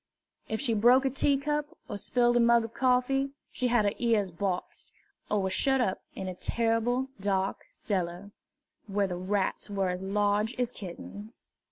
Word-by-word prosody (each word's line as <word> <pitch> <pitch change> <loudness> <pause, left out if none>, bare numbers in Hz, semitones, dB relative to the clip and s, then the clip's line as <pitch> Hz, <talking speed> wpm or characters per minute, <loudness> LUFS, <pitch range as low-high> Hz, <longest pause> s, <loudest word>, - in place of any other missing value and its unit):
If 220 - -1
she 255 -4 +1
broke 245 +5 +5
a 265 - +2
teacup 295 +3 0
or - - -5
spilled 240 +4 +2
a - - +5
mug 235 -1 +5
of 225 - -9
coffee, 270 +1 +2 0.2
she 255 - -1
had 240 -3 +3
her 205 - +2
ears 220 -5 +2
boxed, 180 +1 -4 0.4
or 210 -2 +1
was 190 0 0
shut 270 +4 +2
up 190 -7 0
in 190 - -5
a 185 - -3
terrible 230 +6 0
dark 195 -1 -1
cellar, 185 0 -3 0.6
where 200 0 +1
the 180 -2 -3
rats 190 +3 -1
were 195 -2 0
as 180 0 -3
large 205 +3 +1
as 245 -1 0
kittens. 205 +3 -9
220 Hz, 170 wpm, -29 LUFS, 195-250 Hz, 0.6 s, broke